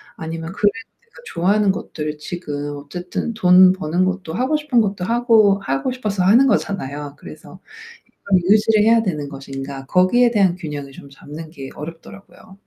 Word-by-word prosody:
아니면 165 +1 -6
그래도 205 0 +2 0.3
내가 470 -1 -37 0.2
좋아하는 200 +3 +2
것들을 150 -5 -6
지금 145 -3 -5
어쨌든 180 +8 -5
돈 185 -3 +6
버는 180 0 -1
것도 185 -3 -3
하고 260 +7 +1
싶은 295 -5 +1
것도 195 -4 -2
하고 225 -4 +3
하고 135 - -1
싶어서 210 -7 -2
하는 225 +9 +5
거잖아요. 145 - -2
그래서 170 +4 -13 0.5
이거를 190 -2 -1
유지를 215 0 +3
해야 225 +1 +4
되는 150 -7 -3
것인가. 135 0 -8
거기에 210 - +3
대한 195 -6 +2
균형을 150 -5 -7
좀 140 - -13
잡는 150 +3 -10
게 135 -4 -9
어렵더라고요. 165 +5 -11
180 Hz, 370 characters per minute, -20 LUFS, 150-210 Hz, 0.5 s, 돈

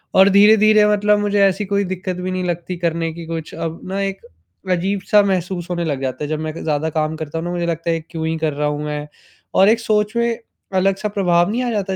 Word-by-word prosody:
और 190 +1 +7
धीरे-धीरे 210 +1 +6
मतलब 210 0 +3
मुझे 205 -1 +1
ऐसी 195 +2 +1
कोई 200 +1 0
दिक़्क़त 185 0 -4
भी 185 +1 -3
नहीं 185 0 -2
लगती 175 +1 -3
करने 165 -1 -1
की, 170 0 -8
कुछ 165 -1 -5
अब 165 0 -4
ना 195 +1 -2
एक 195 0 -3 0.5
अजीब-सा 195 +3 +2
महसूस 185 -2 -1
होने 175 -1 -1
लग 140 -4 -2
जाता 130 +2 -3
है, - - -2
जब 155 -1 -2
मैं 155 -1 -4
क - - -6
ज़्यादा 155 0 0
काम 155 0 -1
करता 155 0 -5
हूँ 165 - -5
ना, 175 - -3
मुझे 175 -1 -2
लगता 165 0 -2
है 165 - 0
कि 155 - -26
क्यों 160 -2 -3
ही 160 - -1
कर 155 -2 -1
रहा 150 +1 -1
हूँ 150 0 -2
मैं? 150 0 -4 0.5
और 195 +2 +6
एक 225 +1 +3
सोच 215 -1 0
में 235 -1 0 0.4
अलग-सा 195 +2 +1
प्रभाव 175 -3 +2
नहीं 245 +3 -1
आ 245 - -1
जाता, 195 -3 -2
180 Hz, 245 wpm, -19 LUFS, 160-200 Hz, 0.5 s, और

